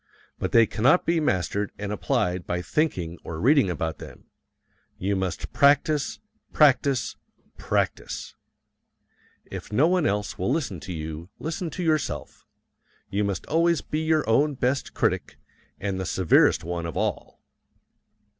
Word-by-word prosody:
But - - -2
they 115 -1 +6
cannot 125 +11 +3
be 170 0 +2
mastered 100 - 0
and 100 0 -4
applied 105 -6 -1
by 90 0 -2
thinking 90 - -1
or 80 -1 -6
reading 135 - +4
about 80 -3 -3
them - - -12 0.7
you 100 +2 -1
must 95 -3 -3
practise, 145 +1 +3 0.3
practise, 140 -3 +3 0.4
PRACTISE. - - -2 1.2
If - - -7
no 135 +9 +4
one 180 -3 +2
else 105 0 -2
will - - 0
listen 135 - -1
to 90 - -8
you, 80 +1 -6
listen 165 +2 -4
to 180 - -5
yourself 155 -3 -2 0.6
you 100 +1 +1
must 100 -2 -2
always 170 +1 +2
be 155 - -3
your 160 -3 +1
own 140 +6 +3
best 130 +2 -1
critic, - - -1 0.4
and 95 -1 -2
the 95 - -3
severest 90 -4 +3
one 85 0 -3
of 80 - -6
all. - - -2
110 Hz, 140 wpm, -25 LUFS, 90-150 Hz, 1.2 s, they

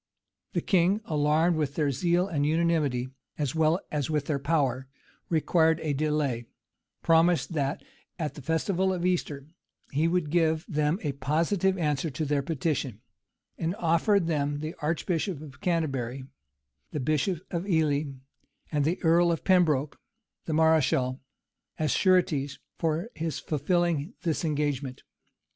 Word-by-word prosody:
The - - 0
king, 190 +3 +2
alarmed 155 +3 +2
with 145 -3 -1
their 150 -3 +1
zeal 175 +7 +1
and 155 -7 -1
unanimity, 150 -5 +1 0.3
as 145 -4 -1
well 160 +2 +2
as 150 -2 -1
with 150 -2 0
their 145 -2 -1
power, 135 -3 0 0.4
required 160 0 +3
a 150 -2 -1
delay; 140 -5 -1 0.6
promised 165 -2 +3
that, 140 -2 -1 0.3
at 155 -4 -3
the 150 - -10
festival 180 +6 0
of 180 -1 -2
Easter, 155 -6 -1 0.5
he 150 +4 +2
would 165 -3 0
give 160 -2 +2
them 150 -1 +1
a 150 - 0
positive 170 +7 0
answer 150 -2 0
to 150 +3 -3
their 145 -1 +1
petition; 140 -6 -2 0.6
and 165 +3 -1
offered 170 +2 +2
them 145 -3 0
the 155 +2 -4
archbishop 165 +2 -1
of 145 -3 -12
Canterbury, 135 - -1 0.7
the 150 - -4
bishop 155 +6 0
of 180 +3 -3
Ely, 155 -4 +2 0.7
and 145 -2 +1
the 170 +4 0
earl 170 +1 +4
of 165 - -2
Pembroke, 155 -7 +2 0.5
the 160 - -2
mareschal, 145 -5 +3 0.6
as 155 -1 0
sureties 155 -7 +2 0.2
for 165 +7 -1
his 160 -1 -3
fulfilling 170 - 0
this 165 -1 -1
engagement. 145 -4 -2
155 Hz, 140 wpm, -28 LUFS, 145-170 Hz, 0.7 s, earl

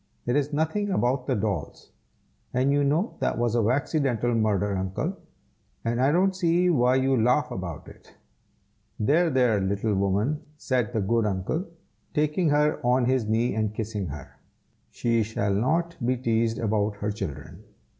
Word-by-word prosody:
"It 120 - 0
is 145 0 +1
nothing 160 +8 0
about 125 -7 0
the 130 - +1
dolls; 105 -2 -4 0.6
and 130 +2 +2
you 145 0 +2
know 155 +10 +1
that - - 0
was 120 -1 0
a 120 - +2
waxidental 125 0 0
murder, 105 -3 +1
Uncle, 95 0 -2 0.7
and 120 +2 0
I 135 +2 +4
don't 190 +4 +2
see 175 0 +2
why 125 -4 +3
you 130 0 +2
laugh 125 +5 +2
about 85 -5 -6
it." - - -15 0.9
"There! 160 +10 +3
there! 125 -7 +2
little 100 +3 0
woman," 100 +9 0 0.2
said 125 -6 -1
the 110 -3 -1
good 110 +3 +1
uncle, 100 - -2 0.5
taking 150 +2 +1
her 150 +1 +2
on 125 +1 +3
his 130 -3 +1
knee 115 +3 +1
and 110 -1 -1
kissing 105 -3 -3
her; 70 -2 -9 0.5
"she 115 -1 0
shall 105 -2 -1
not 165 +11 0
be 125 +2 +1
teased 115 -2 0
about 105 -1 0
her 105 +1 -3
children. 95 -9 -7
120 Hz, 160 wpm, -26 LUFS, 105-145 Hz, 0.9 s, I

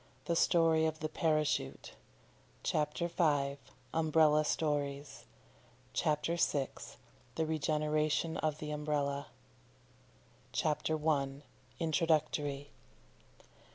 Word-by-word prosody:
THE 170 - 0
STORY 165 -2 +4
OF 155 0 -3
THE 155 - -2
PARACHUTE 155 -1 0 0.7
CHAPTER 150 +3 0
V. 145 -5 +1 0.4
UMBRELLA 155 -1 +4
STORIES 145 -2 -2 0.7
CHAPTER 155 +4 0
VI. 140 -5 +1 0.7
THE 160 - 0
REGENERATION 155 +1 0
OF 155 -1 -1
THE 150 -1 -5
UMBRELLA 145 -1 -1 1.3
CHAPTER 155 -1 0
I. 140 -2 0 0.3
INTRODUCTORY. 155 -3 0
155 Hz, 85 wpm, -33 LUFS, 145-160 Hz, 1.3 s, STORY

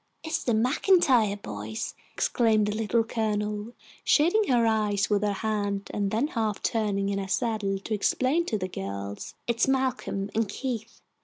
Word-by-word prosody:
"It's 320 0 -2
the 235 - +1
MacIntyre 250 - +3
boys," 110 - -5 0.2
exclaimed 220 -3 +2
the 210 0 -1
Little 225 +1 +1
Colonel, 210 -1 -2 0.3
shading 355 +8 +4
her 240 -3 +3
eyes 210 -2 +1
with 205 -1 +3
her 210 -1 +1
hand 205 -1 -2
and 200 -1 0
then 230 +9 0
half 220 -5 -2
turning 200 -3 0
in 200 0 -1
her 195 - -4
saddle 205 -1 0
to 200 +3 -5
explain 260 - +1
to 215 - 0
the 185 -2 -3
girls. 100 - -6
"It's 235 +1 +1
Malcolm 260 -7 -1
and 225 -2 0
Keith. 230 -4 -5
215 Hz, 160 wpm, -27 LUFS, 200-235 Hz, 0.3 s, shading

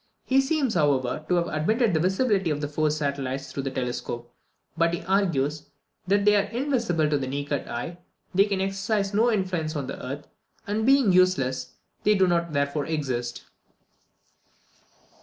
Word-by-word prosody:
He 265 +1 +4
seems, 270 -4 0
however, 145 -3 +1
to 180 - +3
have 170 -1 +1
admitted 210 +9 +1
the 160 - +2
visibility 190 +1 +1
of 150 -1 -1
the 145 - -2
four 155 +1 0
satellites 140 -3 -2
through 140 - -3
the 135 - -3
telescope; 125 -2 -4 0.4
but 170 +1 +2
he - - -7
argues, 155 -7 0 0.4
that 200 +2 +3
as - - -2
they 210 0 +6
are 200 - 0
invisible 235 - 0
to 150 -1 +1
the 130 - -3
naked 140 +1 -3
eye, 165 +9 -5 0.3
they 195 +2 +5
can 200 -2 -1
exercise 195 +1 -1
no 230 +4 +3
influence 180 -6 -1
on 140 -2 -2
the - - -7
earth; 140 +3 -5 0.4
and 215 +3 -1
being 270 -6 +5
useless, 180 -8 +2 0.3
they 210 0 +4
do 190 -1 +4
not 170 -2 +1
therefore 140 0 -1
exist. 130 -6 -3
170 Hz, 170 wpm, -26 LUFS, 140-200 Hz, 0.4 s, they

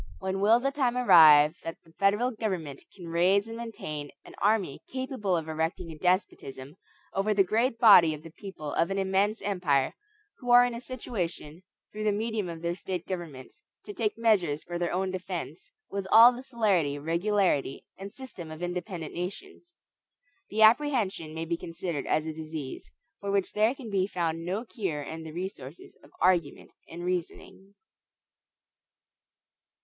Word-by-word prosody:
When 190 0 -3
will 220 +4 +5
the 275 +2 -1
time 255 -4 0
arrive 160 -8 +7
that 165 - -6
the 165 - -20
federal 205 +7 +2
government 185 - -4
can 175 -4 -9
raise 185 +5 +3
and 225 - -7
maintain 155 -11 -6 0.2
an - - -13
army 200 -8 +1
capable 260 -8 -2
of 160 -1 -4
erecting 160 +2 -3
a - - -8
despotism 155 -5 -2 0.4
over 205 +2 0
the 195 - +5
great 230 +5 0
body 180 -9 +7
of 150 - -13
the 165 - -11
people 165 -5 -8
of 170 - +1
an 195 - -2
immense 195 +3 +1
empire, 165 -9 +1 0.5
who 245 - -7
are 245 0 +8
in 245 - -2
a 235 - -6
situation, 185 - -5 0.3
through 215 0 -5
the 210 - +3
medium 215 -2 -2
of 165 0 -8
their 170 0 0
State 180 -1 -5
governments, 170 - -7 0.2
to 415 - -7
take 225 - -1
measures 190 -10 +2
for 175 0 -5
their 175 - -1
own 185 +1 -1
defense, 185 -4 -6 0.2
with 195 -1 -4
all 230 +3 +9
the 245 - -8
celerity, 205 - 0
regularity, 170 -2 0
and 195 +1 -9
system 225 -11 -9
of 155 +2 -8
independent 175 -2 -5
nations? 345 - -7 0.7
The 220 +1 +2
apprehension 215 - +2
may 165 0 -3
be 170 +1 -2
considered 165 -3 -5
as 155 0 +1
a 160 - -4
disease, 155 -3 -7 0.3
for 200 - -5
which 200 -1 0
there 215 +5 +2
can 245 -6 -9
be 190 -1 +1
found 165 -4 -2
no 195 +7 -3
cure 185 -11 -4
in 160 +3 -7
the 160 -1 -8
resources 165 -4 -8
of - - -18
argument 175 -5 +1 0.2
and 175 +1 -7
reasoning. 185 +2 -5
185 Hz, 165 wpm, -28 LUFS, 165-215 Hz, 0.7 s, all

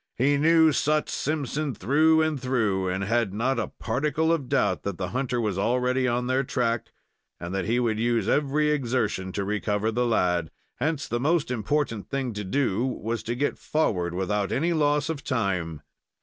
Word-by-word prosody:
He 140 +4 +3
knew 160 +2 +5
Sut 150 +1 +1
Simpson 150 -2 -2
through 155 - +3
and 155 -4 -1
through, 110 -8 0
and 95 +2 -2
had 110 -1 0
not 130 +5 0
a - - -1
particle 150 +7 0
of 140 -6 -2
doubt 140 -2 +1
that 100 -3 -4
the 90 -2 -3
hunter 125 -1 -1
was 105 -5 -1
already 125 +3 +1
on 125 0 0
their 130 +2 +1
track, 120 -3 -1 0.5
and 85 +2 -6
that 95 -1 -1
he 115 +3 +1
would 110 -3 0
use 115 -3 +1
every 150 +2 +2
exertion 120 -9 -1
to 100 - -2
recover 105 +1 -1
the 120 +2 0
lad. 90 -7 +1 0.3
Hence 150 +2 -1
the 120 - -1
most 150 +1 +1
important 115 -1 -1
thing 135 -4 -2
to 105 0 -4
do 115 +1 0
was 115 -3 -2
to 120 - -3
get 145 +4 -1
forward 90 - 0
without 100 +2 -1
any 170 +5 +1
loss 150 -1 +2
of 155 -3 -4
time. 90 - -2
125 Hz, 180 wpm, -26 LUFS, 105-145 Hz, 0.5 s, knew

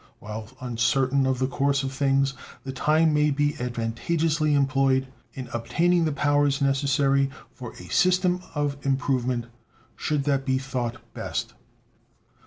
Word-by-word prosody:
While 105 0 -7
uncertain 130 +3 +1
of 130 -1 +1
the 130 - +1
course 140 +1 0
of 135 0 -3
things, 135 0 +2 0.3
the 135 - -5
time 155 +4 +2
may 150 0 +3
be 145 +1 +1
advantageously 150 +6 0
employed 135 -1 +2 0.3
in 130 -2 -6
obtaining 165 +9 +1
the 155 - +1
powers 145 -1 +2
necessary 140 0 +2 0.2
for 125 -4 -9
a 90 - -11
system 180 0 +3
of 145 -1 -1
improvement, 130 -3 0 0.5
should 150 -2 -1
that 140 -1 +1
be 130 -1 +1
thought 125 -3 -3 0.2
best. - - -4
135 Hz, 135 wpm, -25 LUFS, 130-145 Hz, 0.5 s, may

